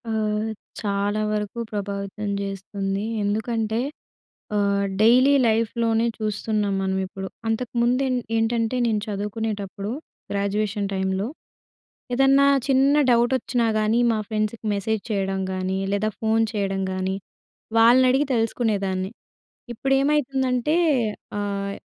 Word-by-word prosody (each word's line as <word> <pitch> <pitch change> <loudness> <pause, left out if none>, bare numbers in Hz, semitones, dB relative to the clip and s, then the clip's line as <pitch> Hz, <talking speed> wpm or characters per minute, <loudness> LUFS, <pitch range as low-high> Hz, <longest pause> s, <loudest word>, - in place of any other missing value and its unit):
ఆహ్, 215 0 -1 0.3
చాలా 205 0 0
వరకు 210 +2 -3
ప్రభావితం 200 0 -4
జేస్తుందీ. 195 0 -3 0.2
ఎందుకంటే, 220 +2 -1 0.8
ఆహ్, 200 -1 +2 0.2
డైలీ 250 +5 +6
లైఫ్‌లోనే 225 +1 +1
చూస్తున్నాం 215 -1 -1
మనమిప్పుడు. 190 0 -2 0.2
అంతకుముందేన్ 250 +3 +1 0.2
ఏంటంటే, 230 +1 +1
నేను 220 -3 +1
చదువుకునేటప్పుడు, 205 -1 -3 0.4
గ్రాడ్యుయేషన్ 200 0 -1
టైమ్‌లో, 190 +1 -1 0.9
ఏదన్నా 270 +2 +5 0.2
చిన్న 270 +1 +4 0.2
డౌటొచ్చినా‌ 240 0 +2
గానీ, 215 +2 +2
మా 220 - 0
ఫ్రెండ్స్‌కి 215 +1 -2
మెసేజ్ 205 +1 -1
చేయడం 195 -1 -1
గానీ, 185 +1 -2
లేదా 210 +2 +1
ఫోను 225 0 +2
చేయడం 195 -2 -1
గానీ, 185 0 -1 0.6
వాళ్ళనడిగి 255 +4 +5
తెలుసుకునేదాన్ని. 200 -5 0 0.6
ఇప్పుడేమైతుందంటే, 270 +1 +1 0.6
ఆహ్, 200 -1 -2
215 Hz, 95 wpm, -24 LUFS, 200-235 Hz, 0.9 s, డైలీ